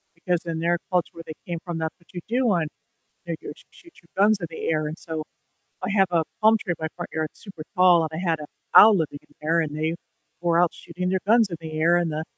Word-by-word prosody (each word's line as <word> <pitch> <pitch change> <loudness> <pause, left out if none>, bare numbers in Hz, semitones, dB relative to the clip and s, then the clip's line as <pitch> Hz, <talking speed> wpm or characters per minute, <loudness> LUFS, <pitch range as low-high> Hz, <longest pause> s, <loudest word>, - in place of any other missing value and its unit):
because 175 0 -1
in 165 -1 -3
their 170 +1 +1
culture 180 -2 +1
where 165 - -9
they 155 - -7
came 170 -2 -3
from, 175 -2 -4
that's 160 0 -3
what 170 - -29
you 175 - -4
do 245 +1 +1
on 170 -5 +1 0.6
New 170 - -2
Year's, 145 - -8
you - - -21
shoot 340 -1 -18
your 170 - -26 0.2
guns 215 -1 +4
in 170 - -3
the 160 - -5
air, 155 -1 0
and 155 +2 -5
so 160 -2 -5 0.6
I 185 - -2
have 195 -2 +3
a 165 -2 +2 0.2
palm 220 +1 +6
tree 185 - -3
in - - -5
my 160 - -1
front 175 - -6
yard, 160 -1 -1
it's - - -21
super 195 -7 -9
tall, 180 -2 +6
and 160 - -2
I 170 +2 -3
had 160 -2 +1
an 150 - -7 0.3
owl 215 -1 +9
living 155 -4 -2
in 145 - -27
there, 165 +2 +2
and 150 -2 -3
they 160 +1 -1 0.5
were 170 -1 +2
out 175 - +3
shooting 180 0 -5
their 190 -1 +1
guns 225 0 +5
in 170 - -4
the 155 -1 -6
air, 170 +2 +4
and 170 -2 0
the 155 +1 -3
170 Hz, 270 wpm, -24 LUFS, 160-180 Hz, 0.6 s, owl